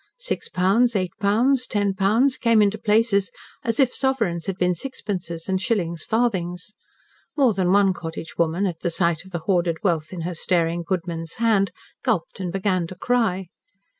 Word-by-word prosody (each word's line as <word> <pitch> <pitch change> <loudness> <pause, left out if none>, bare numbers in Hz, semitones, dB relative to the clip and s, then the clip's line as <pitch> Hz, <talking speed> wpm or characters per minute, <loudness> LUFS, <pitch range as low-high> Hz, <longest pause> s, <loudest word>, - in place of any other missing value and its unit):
Six - - -3
pounds, 210 +6 +2
eight 185 -3 0
pounds, 240 +6 +2
ten 205 -2 0
pounds, 220 +8 +2
came 230 -2 +3
into 210 +1 +2
places 210 -2 +2 0.3
as 230 +2 -1
if 260 -3 +4
sovereigns 225 -12 0
had 190 -1 -2
been 180 -1 +2
sixpences, 175 -6 -5
and 190 -1 0
shillings 170 -6 -1
farthings. 195 -5 -1 0.6
More 260 -6 +4
than 185 -2 +1
one 195 -1 +4
cottage 165 -2 -7
woman, 170 +4 +1
at 175 -4 -3
the 175 - -1
sight 170 0 0
of 190 - -14
the 170 -3 -4
hoarded 175 -4 +1
wealth 165 -5 0
in 180 -2 -5
her 175 +2 -3
staring 170 0 0
goodman's 165 -2 -3
hand, 220 -4 +2 0.3
gulped 220 -11 -1
and 180 -2 -3
began 185 -2 0
to 185 - -9
cry. 190 -4 0
190 Hz, 170 wpm, -23 LUFS, 170-220 Hz, 0.6 s, if